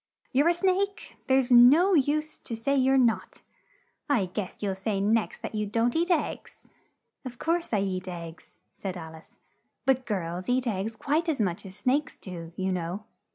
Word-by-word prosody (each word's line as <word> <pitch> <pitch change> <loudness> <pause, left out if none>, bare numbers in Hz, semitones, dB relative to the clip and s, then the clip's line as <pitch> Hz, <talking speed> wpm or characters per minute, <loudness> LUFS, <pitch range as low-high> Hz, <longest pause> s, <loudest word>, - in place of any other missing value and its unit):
You're 285 +4 +3
a - - +4
snake; 390 +2 0
and - - -26
there's 265 -1 +3
no 280 +11 +7
use 305 0 +1
to 230 - -6
say 255 +5 0
you're 265 0 +4
not. 235 -4 +1 0.7
I 240 -9 +3
guess 185 +1 -5
you'll 195 -2 0
say 195 +1 -2
next 215 +3 0
that - - -5
you 210 -1 -1
don't 230 +3 +1
eat 340 +2 +1
eggs!" 335 -5 -2 0.6
"Of 250 -2 -8
course 335 +4 -1
I 210 -3 +2
eat 185 -1 -3
eggs," 170 -2 -8 0.2
said 190 -2 -5
Al 160 -1 -8
ice, 160 0 -16 0.5
"but 260 -2 +2
girls 180 -1 -3
eat 255 +1 +2
eggs 220 0 -2
quite 305 +9 0
as 300 - -1
much 190 -2 -1
as 190 - -11
snakes 275 +7 0
do, 170 -3 -8
you 190 0 -1
know." 180 +3 -3
230 Hz, 185 wpm, -27 LUFS, 190-280 Hz, 0.7 s, no